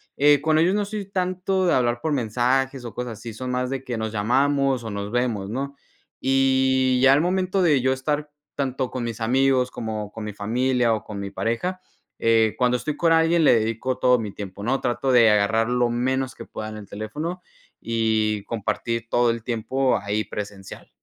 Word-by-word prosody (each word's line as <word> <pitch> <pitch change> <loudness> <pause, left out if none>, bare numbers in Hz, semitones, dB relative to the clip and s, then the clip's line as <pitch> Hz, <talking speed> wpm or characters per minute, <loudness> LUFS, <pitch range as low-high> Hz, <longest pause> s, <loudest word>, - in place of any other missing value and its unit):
eh, 145 0 +5
con 155 +2 +2
ellos 175 +4 +3
no 205 0 0
soy 210 0 -5
tanto 185 0 0
de - - +3
hablar 120 -1 +1
por 155 - -1
mensajes 125 +2 0
o 115 - -7
cosas 120 -4 -5
así, 115 -1 -7
son 125 +3 -5
más 125 0 -1
de 135 -1 -4
que 120 -3 -4
nos 110 0 -3
llamamos 135 +3 +1
o - - -4
nos 100 0 -5
vemos, 115 -5 -1
¿no? 140 +4 -4 0.5
Y 130 -1 +2
ya 135 - +7
al 140 - +5
momento 185 +2 0
de 150 -7 +3
yo 130 +1 +2
estar 145 +3 -2 0.2
tanto 130 -2 -2
con 130 -2 -4
mis 115 -1 -4
amigos 130 +2 +2
como 110 -3 -5
con 110 - -7
mi 105 - -4
familia 120 +3 +1
o 110 - -3
con 100 -2 -7
mi 100 0 -4
pareja, 180 - -2 0.4
eh, 115 -1 +3
cuando 125 -1 +2
estoy 145 +5 -4
con 165 -1 +2
alguien 165 0 +4
le 120 -6 +5
dedico 115 +4 -2
todo 125 0 +4
mi 105 -3 -4
tiempo, 100 0 -8
¿no? 130 +4 0
Trato 130 +2 -1
de 115 -3 +6
agarrar 110 +2 +2
lo 125 -1 +2
menos 130 +2 -1
que - - -9
pueda 110 0 -6
en 110 - -8
el 105 -2 -10
teléfono 150 - -5 0.4
y 110 -2 0
compartir 115 +1 -3
todo 120 -1 +3
el 115 -1 -2
tiempo 130 +3 0
ahí 105 +1 -2
presencial. 100 -2 -8
125 Hz, 200 wpm, -23 LUFS, 110-135 Hz, 0.5 s, ya